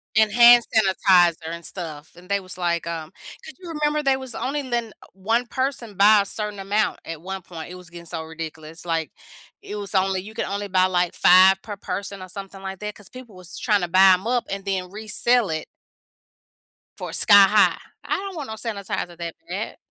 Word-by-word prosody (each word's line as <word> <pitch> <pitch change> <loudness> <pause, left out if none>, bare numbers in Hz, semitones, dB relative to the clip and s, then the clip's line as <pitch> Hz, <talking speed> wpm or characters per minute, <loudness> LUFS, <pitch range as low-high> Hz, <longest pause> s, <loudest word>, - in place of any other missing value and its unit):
And 215 -1 +4
hand 240 +1 +8
sanitizer 180 -5 +3
and 170 0 -7
stuff, 155 -5 -7
and 180 - -15
they 200 +1 0
was 185 -1 -10
like, 170 -2 -1
um, 160 -2 -5 0.3
could 315 - -10
you 355 - -9
remember 300 0 +1
they 270 -2 +2
was 260 -2 -7
only 280 +5 -3
let 240 -3 -2
n 220 - -15
uh, - - -16
1 225 +6 0
person 260 -3 -3
buy 205 +2 +6
a - - -12
certain 210 0 -4
amount 205 +2 0
at 165 -2 -7
one 190 +1 -6
point? 165 -2 -9
It 180 - -9
was 180 -2 -13
getting 170 0 -11
so 165 -1 -4
ridiculous, 160 0 -9
like, 165 -4 -2 0.5
it 210 - -8
was 205 -1 -5
only 190 -1 +1
you 210 +3 -11
could 225 - -3
only 200 +1 -4
buy, 185 -1 +3
like, 180 -2 0
5 190 +1 +6
per 210 0 -7
person 195 0 -5
or 185 - -11
something 195 0 -9
like 190 -1 -6
that, 210 0 -6
'cause 205 - -14
people 255 -5 -12
was 185 -1 -10
trying 210 -5 +1
to 175 - -1
buy 190 +2 +6
'em 185 +2 -1
up 245 +1 0
and 195 0 -5
then 185 -2 -2
resell 220 +3 0
it 155 0 -3 1.3
for - - -7
sky 200 -1 +7
high. 210 +1 +4 0.3
I - - -1
don't 390 -1 -6
want 295 -4 -6
no 220 - -5
sanitizer 200 -6 -5
that 170 -1 -5
bad. - - -5
195 Hz, 215 wpm, -23 LUFS, 175-220 Hz, 1.3 s, hand